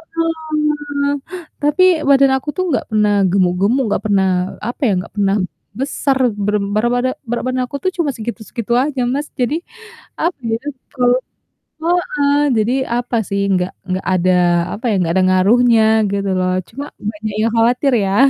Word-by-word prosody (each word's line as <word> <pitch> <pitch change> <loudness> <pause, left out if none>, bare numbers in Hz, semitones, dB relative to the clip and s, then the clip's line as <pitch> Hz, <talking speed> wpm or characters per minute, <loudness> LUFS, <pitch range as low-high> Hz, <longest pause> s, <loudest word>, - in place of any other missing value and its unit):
heeh, 300 -3 -1 0.5
tapi 295 +5 +3 0.3
badan 275 -1 +5
aku 270 +3 -6
tuh 370 - 0
nggak 255 - 0
pernah 210 -1 +3 0.2
gemuk-gemuk, 195 +7 +2
nggak - - -1
pernah, 195 -2 +2 0.4
apa 240 +7 -5
ya, 210 - +2
nggak 180 - -8
pernah 200 0 +2 0.4
besar 275 0 0 0.2
berem 205 0 0
barabada 245 +3 +1 0.2
berat 240 - -2
badan 255 0 0
aku 280 - -5
tuh 375 - +1
cuma 320 -4 +1
segitu-segitu 235 +1 -4
aja, 265 0 0
Mas, 290 +2 -2
jadi, 255 +2 -1 0.6
apa 345 +1 0
ya, 225 -1 0 0.3
terlalu 250 -2 +2 0.6
heeh, 300 -4 +1 0.2
jadi 220 +4 +1 0.2
apa 245 0 -2
sih, 200 0 -1
nggak 180 0 0 0.2
nggak 185 +1 -2
ada, 185 0 +2 0.4
apa 225 - -9
ya, - - +1
nggak 170 -2 0
ada 190 - +3
ngaruhnya 225 +5 +4 0.3
gitu 200 -1 -1
loh, 185 0 +1 0.2
cuma 275 +5 -6 0.3
banyak 215 -1 -6
yang 230 - +1
khawatir 245 +4 +3
ya, 195 0 0
245 Hz, 155 wpm, -17 LUFS, 205-285 Hz, 0.6 s, badan